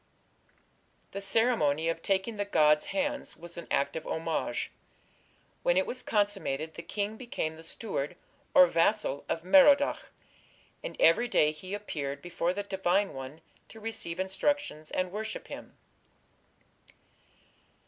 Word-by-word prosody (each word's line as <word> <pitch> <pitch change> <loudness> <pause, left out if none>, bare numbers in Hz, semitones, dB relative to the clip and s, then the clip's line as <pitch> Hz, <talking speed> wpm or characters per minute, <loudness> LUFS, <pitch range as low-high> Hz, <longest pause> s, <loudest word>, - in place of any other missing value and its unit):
The 200 - -5
ceremony 195 -8 +2
of 165 0 -1
taking 195 +4 0
the 205 - 0
god's 150 -6 +4
hands 290 0 -2
was 170 0 -10
an 170 - -8
act 140 - +1
of 160 - -5
homage. 160 -6 -2 0.9
When 175 - +2
it 190 - +3
was 255 - -5
consummated 195 -8 -1
the 170 - -7
king 205 +5 -3
became 230 -10 -3
the 160 - -12
steward 170 -3 -4 0.4
or 180 - +10
vassal 170 -3 +1
of 165 - -1
Merodach, 285 - +5 0.7
and - - -6
every 245 - +5
day 150 -9 +3
he 185 +6 -6
appeared 145 -9 -4
before 170 +2 -1
the 205 +2 -3
divine 190 0 +1
one 135 +4 -8 0.3
to 220 - -12
receive 210 -6 -4
instructions 190 - -1
and 185 -1 -1
worship 220 +2 -5
him. - - -9
185 Hz, 135 wpm, -30 LUFS, 160-215 Hz, 0.9 s, or